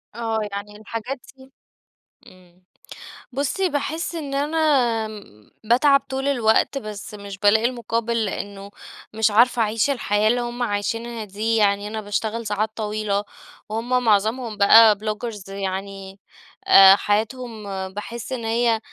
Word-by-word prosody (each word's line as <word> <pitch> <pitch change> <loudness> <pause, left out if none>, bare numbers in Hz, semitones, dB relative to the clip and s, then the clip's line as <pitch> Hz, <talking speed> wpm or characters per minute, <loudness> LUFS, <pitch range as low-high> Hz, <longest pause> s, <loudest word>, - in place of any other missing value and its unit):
آه، 225 -1 -2
يعني 205 +1 -7
الحاجات 230 +5 -6 0.2
دي 265 0 -18 0.8
إمم، 180 0 -20 0.7
بصي 290 +8 -1
باحس 320 +3 -3
إن 290 -4 -5
أنا 295 +3 -1 0.5
امم، 200 - -12
باتعب 275 +5 +4
طول 270 +1 -3
الوقت، 240 0 +2
بس 215 -4 -7
مش 200 -2 -8
بالاقي 220 +3 +4
المقابل، 230 -1 -1
لأنه 200 0 -6 0.4
مش 220 0 +2
عارفة 235 +2 +4
أعيش 220 +4 +1
الحياة 215 -6 +1
اللي 245 +2 +2
هم 240 +1 -4
عايشينها 225 +2 -3
دي، 215 +3 -2
يعني 205 -1 +2
أنا 220 +1 -5
باشتغل 220 +2 -3
ساعات 210 +1 -1
طويلة، 210 -1 -2 0.5
وهم 240 +3 -1
معظمهم 220 +1 +1
بقا 215 +2 +7
بلوجرز 215 -1 -5
يعني 195 0 -6 0.5
آآ، 195 0 +9
حياتهم 220 +2 -2 0.3
باحس 230 +4 -7
إن 235 -3 -4
هي 230 0 +1
220 Hz, 130 wpm, -22 LUFS, 205-240 Hz, 0.8 s, آآ